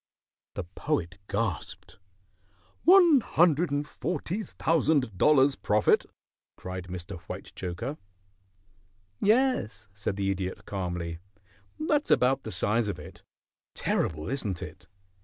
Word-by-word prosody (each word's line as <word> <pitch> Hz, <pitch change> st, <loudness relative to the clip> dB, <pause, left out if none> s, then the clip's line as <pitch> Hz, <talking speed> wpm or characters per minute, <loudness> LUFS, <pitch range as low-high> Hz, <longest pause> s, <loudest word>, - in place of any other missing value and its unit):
The 100 Hz, -, -3 dB
Poet 85 Hz, +1 st, -3 dB
gasped. 100 Hz, -2 st, -3 dB, 0.9 s
"One 345 Hz, -5 st, +8 dB
hundred 170 Hz, -3 st, +3 dB
and 145 Hz, +1 st, -1 dB
forty 175 Hz, -, -3 dB
thousand 155 Hz, -, +1 dB
dollars 140 Hz, +5 st, +5 dB
profit!" 105 Hz, 0 st, +2 dB, 0.5 s
cried 90 Hz, -1 st, -6 dB
Mr. 90 Hz, +1 st, -6 dB
Whitechoker. 95 Hz, -, -6 dB, 1.2 s
"Yes," 230 Hz, -, +2 dB
said 100 Hz, 0 st, -3 dB
the 100 Hz, -1 st, 0 dB
Idiot, 95 Hz, -1 st, -4 dB
calmly, 85 Hz, -4 st, -4 dB, 0.6 s
"that's 305 Hz, -1 st, +1 dB
about 130 Hz, +2 st, +3 dB
the 110 Hz, -, -7 dB
size 110 Hz, +2 st, +1 dB
of 100 Hz, -, -3 dB
it. -, -, -11 dB, 0.5 s
Terrible, 75 Hz, -1 st, -1 dB
isn't 110 Hz, -9 st, -2 dB
it? -, -, -10 dB
115 Hz, 105 wpm, -28 LUFS, -, 1.2 s, One